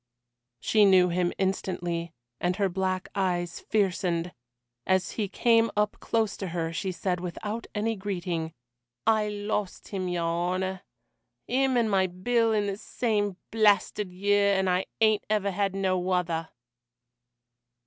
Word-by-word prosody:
She 215 - +3
knew 185 -2 +6
him 175 0 +1
instantly, 175 -3 -2 0.3
and 180 +1 0
her 200 -1 +1
black 185 0 -2
eyes 175 -3 -1
fiercened; 180 -4 0 0.5
as 190 0 +2
he 210 -3 -2
came 230 +2 +3
up 210 0 +1
close 220 -3 0
to 195 - -4
her 165 -1 -2
she 190 +2 -2
said 180 0 -2
without 205 +6 -5
any 225 +2 0
greeting: 175 -5 -3 0.5
"I 215 -1 +3
lost 205 -1 -3
him, 190 -2 -3
your 175 -1 -1
honour 180 +3 -1 0.7
him 260 0 +2
and 235 -2 +3
my 190 -1 +3
Bill 225 +6 +1
in 210 -2 +1
the 200 -1 -2
same 205 -4 -1
blasted 210 -2 +2
year, 200 +2 +2
and 190 0 +1
I 180 +1 +1
ain't 215 -1 +4
never 205 -2 +1
had 195 0 -1
no 185 -2 0
other." 165 -3 0
190 Hz, 140 wpm, -27 LUFS, 180-210 Hz, 0.7 s, knew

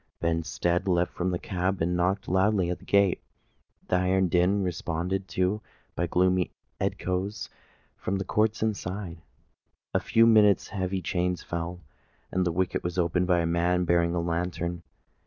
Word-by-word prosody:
Benstead 85 +2 0
leapt 90 -1 +1
from 90 +1 -1
the 90 - 0
cab, 95 +1 -2
and 90 +2 0
knocked 95 +3 0
loudly 95 -1 +2
at 90 - -4
the - - -16
gate. 100 -3 +3 0.7
The 90 - +2
iron 90 0 +2
din 90 +4 +3
was - - -1
responded 90 +2 -2
to 95 +3 0 0.3
by 85 - 0
gloomy 90 +1 +2 0.3
echoes 95 +3 -2 0.5
from 95 - -2
the 95 0 -2
courts 110 +3 +1
inside. 95 -4 -3
In - - -22 0.7
a - - +3
few 115 0 +4
minutes 105 -4 +5
heavy 95 -2 -2
chains 90 +1 -1
fell, 85 +1 -4 0.5
and 90 0 +1
the - - +1
wicket 90 +2 -1
was 90 +1 -3
opened 90 +1 +1
by 90 -2 +3
a - - 0
man 85 +2 +1
bearing 85 0 +2
a - - +1
lantern. 85 0 -2
90 Hz, 165 wpm, -27 LUFS, 85-95 Hz, 0.7 s, minutes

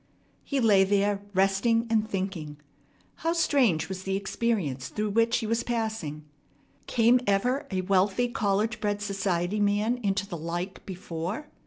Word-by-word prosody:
He 280 - -1
lay 210 -5 +5
there 200 +1 +1
resting 195 +5 +2
and 220 -1 +1
thinking. 185 -7 -4 0.6
How 330 +1 0
strange 255 - +2
was 190 -1 -5
the 195 0 -2
experience 195 - -1
through 210 -1 -2
which 230 +2 +3
he 230 - -3
was 230 +2 0
passing! 220 -11 -3 0.6
Came 240 +1 +4
ever 245 +8 +1
a 185 -2 -1
wealthy, 195 +5 +2
college 215 0 0
bred, 205 -1 0
society 195 -1 -1
man 210 +4 +1
into 200 -3 -1
the 180 -4 -6
like 175 +4 -5
before? 185 - -5
205 Hz, 145 wpm, -27 LUFS, 190-230 Hz, 0.6 s, lay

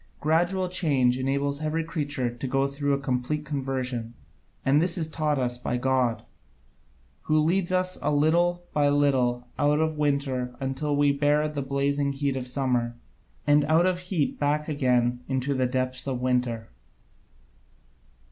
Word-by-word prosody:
Gradual 175 +4 +1
change 140 -9 +1
enables 140 +2 -1
every 155 +1 -1
creature 145 -6 -2
to 125 +2 -5
go 135 +1 +1
through 140 +1 -1
a - - +2
complete 135 +3 -2
conversion; 130 -4 -3 0.5
and 140 +3 +4
this 175 +1 +1
is 160 -3 -1
taught 155 -2 -1
us 125 -1 -1
by 125 0 -2
God, 125 -2 +1 1.0
who 155 - +2
leads 175 +4 +1
us 185 0 0
little 165 +4 +2
by 145 -1 +3
little 130 -4 +1
out 145 +1 +3
of 160 -1 0
winter 135 -4 -1
until 135 +2 -2
we 145 0 +4
can 140 - -4
bear 150 +1 +3
the 150 -2 -4
blazing 140 +1 0
heat 140 -1 -1
of 130 -1 -4
summer, 125 -2 0 0.5
and 145 0 +4
out 160 +4 +4
of 185 -1 +1
heat 180 -5 -2
back 150 +1 0
again 125 -5 +1
into 130 +1 -1
the 130 -1 +1
depths 130 +1 -2
of 130 -2 -2
winter. 125 -3 -1
140 Hz, 155 wpm, -26 LUFS, 130-150 Hz, 1.0 s, and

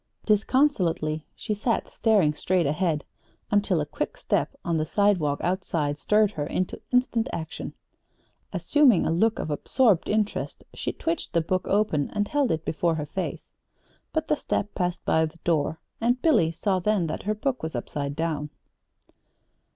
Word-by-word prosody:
Disconsolately 195 - +2
she 215 - -3
sat 225 +3 0
staring 205 -10 +2
straight 180 +2 +1
ahead 155 +1 0 0.5
until 205 -4 +2
a 150 - 0
quick - - -4
step - - 0
on 170 -1 +1
the 155 - +1
sidewalk 170 -4 +2
outside 165 -5 -1
stirred 210 -1 +3
her 145 -6 -3
into 185 - -2
instant 250 -2 +2
action. 160 -1 -5 0.8
Assuming 275 - +4
a - - +1
look 220 +7 +2
of 155 - -3
absorbed 205 - +2
interest 210 0 -1
she - - -3
twitched 330 +1 -3
the 170 - +3
book 185 +3 -1
open 195 -8 +1
and 205 0 +1
held 285 -4 +2
it 160 0 -1
before 165 +1 +1
her 150 -2 -3
face.... 185 +5 -5 0.6
But 315 - -1
the - - +2
step 210 -7 -2
passed 180 -2 -2
by 160 0 +3
the 155 +2 -14
door: 160 -1 +1 0.2
and 245 +2 +2
Billy 245 - +3
saw 190 +3 0
then 200 -1 +1
that 155 - -3
her 215 +2 -1
book 255 +4 -2
was 160 -3 -4
upside 140 +3 -3
down. 155 -2 -2
180 Hz, 160 wpm, -26 LUFS, 160-215 Hz, 0.8 s, Assuming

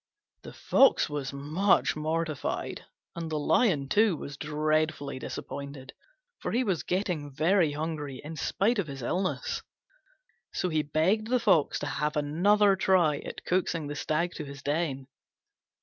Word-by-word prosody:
The - - -10
Fox 270 - +4
was 145 -3 -3
much 155 +8 +2
mortified, 155 -1 -2 0.3
and 165 -1 -4
the 155 - -1
Lion, 155 - +2
too, 205 0 +3
was 140 - -7
dreadfully 150 -1 -1
disappointed, 140 0 -7 0.5
for - - -3
he 245 +3 +2
was 190 -8 0
getting 180 -6 -2
very 160 +2 +2
hungry 150 -3 -4
in 155 +2 -7
spite 205 +8 +1
of 185 - -1
his 135 -3 -7
illness. 190 - -1 0.9
So 180 - 0
he 155 -2 +1
begged 165 +9 +1
the 250 +1 +2
Fox 190 -10 +3
to - - -4
have 150 +1 -1
another 195 +8 +3
try 175 -6 +3
at - - -8
coaxing 175 -3 0
the 145 0 -5
Stag 160 +4 -1
to 155 - -4
his 140 0 -10
den. 145 -3 -1
155 Hz, 150 wpm, -28 LUFS, 145-185 Hz, 0.9 s, Fox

